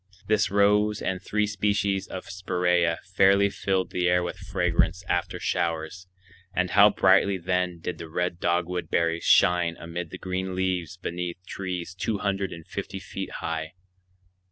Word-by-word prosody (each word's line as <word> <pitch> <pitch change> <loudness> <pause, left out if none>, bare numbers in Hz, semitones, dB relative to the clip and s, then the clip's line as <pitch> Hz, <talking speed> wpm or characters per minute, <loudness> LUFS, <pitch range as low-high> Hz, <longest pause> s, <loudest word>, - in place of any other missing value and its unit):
This 105 -1 +2
rose 105 +1 +3
and 95 -1 -2
three 105 +2 0
species 100 -1 0
of 95 - -7
spiræa 90 -3 +1 0.2
fairly 100 +1 +5
filled 95 -2 -1
the 90 -1 0
air 90 0 +3
with 90 - -4
fragrance 90 +3 0
after 90 0 -1
showers; 85 +1 -2 0.5
and 90 0 0
how 100 +1 +7
brightly 95 0 +4
then 90 0 -1
did 85 +2 -5
the 80 - -7
red 90 +1 -2
dogwood 90 +1 -1
berries 85 0 0
shine 90 -1 +4
amid 85 0 -5
the 90 - -7
green 95 0 -3
leaves 90 -2 -1
beneath 90 -1 -4
trees 90 -3 -5
two 100 +4 -2
hundred 100 -1 -1
and 85 -2 -9
fifty 100 0 -5
feet 95 +1 -6
high. 80 +1 -4
90 Hz, 155 wpm, -26 LUFS, 90-95 Hz, 0.5 s, how